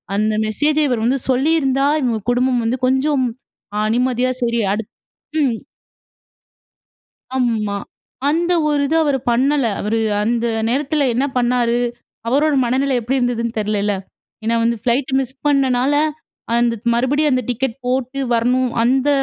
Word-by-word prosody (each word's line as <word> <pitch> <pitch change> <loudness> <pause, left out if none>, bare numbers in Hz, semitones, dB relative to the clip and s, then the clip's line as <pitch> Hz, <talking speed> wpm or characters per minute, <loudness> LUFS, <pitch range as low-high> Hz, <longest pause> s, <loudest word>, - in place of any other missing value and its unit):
அந்த 215 +1 +1
மெசேஜ 295 +8 +1
இவரு 240 -4 -1
வந்து 265 +2 +1
சொல்லியிருந்தா, 275 0 +2
இவங்க 235 -4 0
குடும்பம் 250 0 +1
வந்து 245 +3 -1
கொஞ்சம் 265 +1 +1 0.5
அ 210 - +1
நிம்மதியா, 255 0 +1
சரி 235 0 0
அடுத் 215 0 -4 0.5
ம். 235 -5 -1 1.7
ஆமா. 220 -5 0 0.5
அந்த 340 +3 +1 0.2
ஒரு 295 -1 +1
இத 320 - 0
அவரு 280 -3 +1
பண்ணல. 270 +3 +2 0.2
அவரு 225 +2 0 0.2
அந்த 235 +1 0 0.2
நேரத்தில 280 +2 0
என்ன 255 +4 +1
பண்ணாரு, 240 -1 +2 0.5
அவரோட 290 +5 +2
மனநிலை 260 +2 +1
எப்படி 255 +4 -1
இருந்துதுன்னு 235 -2 -1
தெர்லல்ல. 210 -1 0 0.5
ஏன்னா 230 +1 +1
வந்து 235 0 +1
ஃப்ளைட்ட 255 +3 0
மிஸ் 265 0 -3
பண்ணனால, 270 -1 +2 0.6
அந்த 235 0 +2 0.2
மறுபடியும் 285 +5 +1
அந்த 255 -1 0
டிக்கெட் 245 0 -1
போட்டு 260 +1 -1
வரணும். 250 +2 +2
அந்த 265 +3 +2
255 Hz, 130 wpm, -19 LUFS, 235-275 Hz, 1.7 s, சொல்லியிருந்தா